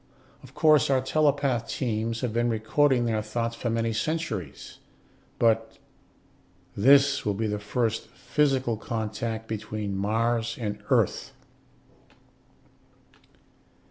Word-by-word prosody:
Of - - -16
course 155 -3 +4
our 135 -1 +3
telepath 135 -3 +1
teams 115 -2 -2
have 120 -4 -2
been 120 +1 +1
reading 120 +3 +2
their 110 -2 0
thoughts 115 +2 -3
for 120 - -3
many 115 0 0
centuries, 110 - -4 0.6
but 115 -1 +1 1.0
this 140 +5 +5
will 105 -1 -1
be 110 +3 -2
the 105 -1 -2
first 110 +2 -2
physical 135 -6 0
contact 110 0 -4
between 105 -2 -4
Mars 115 +3 0
and 105 -3 -4
Earth." - - +1
115 Hz, 110 wpm, -26 LUFS, 110-130 Hz, 1.0 s, this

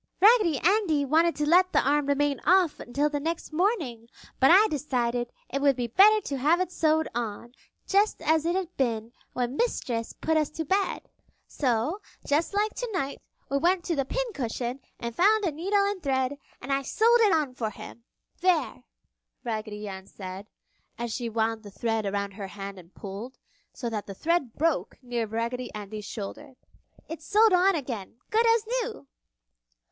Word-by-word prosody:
"Raggedy 410 - +5
Andy 340 -4 +2
wanted 325 +4 +3
to 300 - -1
let 365 +3 +5
the - - +5
arm 290 0 +2
remain 285 -1 +1
off 360 -2 +3
until 280 +5 0
the 295 -1 -2
next 325 +1 -4
morning, 305 - 0 0.3
but 265 - +6
I 400 +5 +7
decided 245 - -1 0.2
it 275 - -3
would 280 -1 +4
be 245 -1 -2
better 400 - +6
to 280 -7 -4
have 305 +7 +3
it 370 -1 -1
sewed 315 -2 +2
on, 235 0 -4 0.3
just 405 +2 +2
as 315 0 +3
it 340 +2 0
had 365 -2 -3
been 230 -3 -1 0.2
when 250 +1 -2
Mistress 245 - -1
put 320 0 0
us 305 -2 +1
to 320 +1 -5
bed. 390 +5 0 0.4
So, 260 - -1 0.2
just 310 +7 0
like 425 +1 +1
tonight, 370 - -3 0.3
we 280 - +2
went 350 +3 +2
to 335 - -1
the 275 - +1
pincushion 265 - -3 0.2
and 235 -1 -5
found 420 +3 +4
a 340 - +1
needle 395 +7 +1
and 400 -2 -2
thread 265 -1 0 0.2
and 275 +3 -3
I 275 - +1
sewed 460 - +3
it 425 -3 +5
on 300 -5 +1
for 230 -3 -2
him!" 225 +2 -11 0.4
"There!" 335 -8 +1 0.6
Raggedy 215 -3 -4
Ann 190 -1 -8
said, 190 +1 -8 0.5
as 235 -1 -3
she 240 -2 -3
wound 225 0 -1
the 205 - -11
thread 225 +1 -2
around 200 0 -2
her 195 0 -7
hand 195 0 -8
and 175 0 -16
pulled, 205 +6 -8 0.3
so 245 - -5
that 210 -2 -4
the 195 - -7
thread 310 - 0
broke 325 -1 0
near 240 -2 -2
Raggedy 235 +3 -3
Andy's 210 0 -7
shoulder. 255 +7 -7 0.5
"It's 315 -1 -8
sewed 425 0 +5
on 370 +1 +4
again, 240 - -5 0.2
good 455 +2 +3
as 455 -1 +3 0.2
new!" 445 - -7
280 Hz, 175 wpm, -27 LUFS, 235-360 Hz, 0.6 s, I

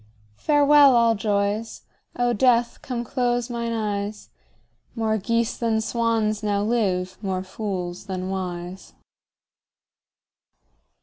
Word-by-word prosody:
Farewell, 290 -2 +5
all 230 -1 +4
joys; 205 +1 -1 0.3
O 245 0 +1
Death, 240 +1 +2
come 245 -2 -4
close 245 0 -1
mine 235 -1 -3
eyes; 210 -2 -3 0.7
More 220 -2 0
geese 230 +3 0
than 225 -2 0
swans 220 -2 0
now 205 -1 0
live, 185 -5 -1
more 190 -2 -2
fools 185 -3 -5
than 185 -1 -4
wise. 180 -1 -5
220 Hz, 105 wpm, -24 LUFS, 195-235 Hz, 0.7 s, Farewell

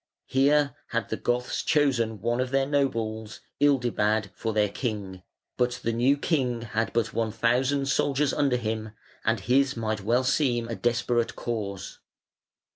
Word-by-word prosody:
Here 140 +1 +3
had - - -2
the - - -1
Goths 125 0 -1
chosen 120 -8 +1
one 120 +3 0
of 130 - -2
their 135 0 +2
nobles, 115 -6 -1 0.2
Ildibad, 115 -7 +2
for 115 - -3
their 105 -1 +2
king, 100 -4 -4 0.4
but 125 0 +1
the 115 - 0
new 125 +5 +3
king 130 -6 0
had 115 0 -2
but 115 -2 0
one 115 -1 0
thousand 130 +5 +1
soldiers 140 +1 +1
under 135 -4 +2
him, 110 -2 -3 0.3
and 115 -3 +1
his 130 +4 +2
might 110 -2 -2
well 120 +6 +2
seem 125 -3 +1
a 115 - -4
desperate 120 0 0
cause. 105 -5 -5
120 Hz, 150 wpm, -26 LUFS, 110-135 Hz, 0.4 s, Here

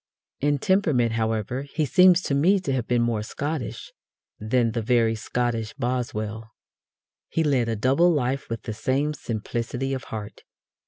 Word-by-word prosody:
In 145 +1 +2
temperament, 145 - +2
however, 110 +2 -1
he 145 +2 -2
seems 180 +3 +5
to - - -1
me 175 +8 +4
to 140 -7 -2
have 125 -3 -1
been 120 -1 +2
more 115 -2 0
Scottish 145 +4 -5 0.5
than 115 +2 +1
the 115 0 -2
very 115 0 +2
Scottish 115 0 -2
Boswell. 115 -4 -3 0.8
He 165 - 0
led 130 -6 +2
a 115 - 0
double 135 +11 +3
life 135 -3 -1
with 115 -1 -4
the 110 - -4
same 135 +7 0
simplicity 120 +2 -3
of 130 - -4
heart. 105 -1 -7
125 Hz, 155 wpm, -25 LUFS, 115-145 Hz, 0.8 s, seems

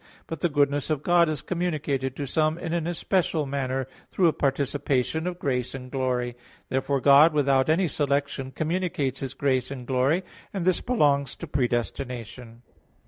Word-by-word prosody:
But 165 - -6
the 175 - +1
goodness 145 -1 +1
of 150 -2 -1
God 175 -2 +4
is 155 -2 -3
communicated 150 -7 -2
to 145 - -4
some 155 +3 +1
in 170 -1 -4
an 170 -1 -1
especial 175 -2 0
manner 135 -1 -2 0.2
through 180 -3 +3
a - - -1
participation 140 +2 0
of 180 -1 -3
grace 125 -6 -2
and 130 -1 -8
glory. 125 -2 -1 0.3
Therefore 135 +1 0
God 145 +4 +7
without 140 -2 +2
any 175 +3 +3
selection 140 -2 -1
communicates 155 -3 -2
His 135 -1 -5
grace 130 -2 0
and 130 -3 -7
glory; 135 +8 +1 0.3
and 190 -4 -2
this 185 -1 +2
belongs 145 - +1
to - - -7
predestination. 120 -2 -3
140 Hz, 160 wpm, -26 LUFS, 130-160 Hz, 0.3 s, God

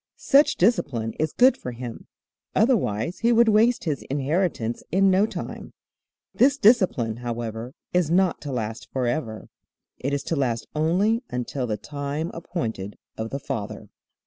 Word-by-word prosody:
Such 285 +2 +4
discipline 140 - +1
is 155 -1 0
good 255 +2 +5
for 125 - -7
him, 120 -1 -8 0.5
otherwise 185 - +1
he 235 +1 +3
would 235 0 +5
waste 225 +3 +4
his 150 -6 -2
inheritance 140 -4 -1
in 195 +1 +4
no 195 +3 +4
time. - - -7 0.6
This 275 +3 +4
discipline, 185 - +3
however, 120 0 -5 0.2
is 180 -4 +2
not 180 +1 +2
to 145 - -5
last 110 -2 -4
forever. 120 -3 -2 0.5
It 140 - -2
is 140 -1 -1
to 165 - -2
last 125 -5 -1
only 185 +9 +2
until 125 +1 -3
'the 105 -2 -2
time 145 +5 -4
appointed 115 - -4 0.2
of 110 0 -4
the 140 - -4
father.'" 105 -6 -5
145 Hz, 145 wpm, -24 LUFS, 120-190 Hz, 0.6 s, good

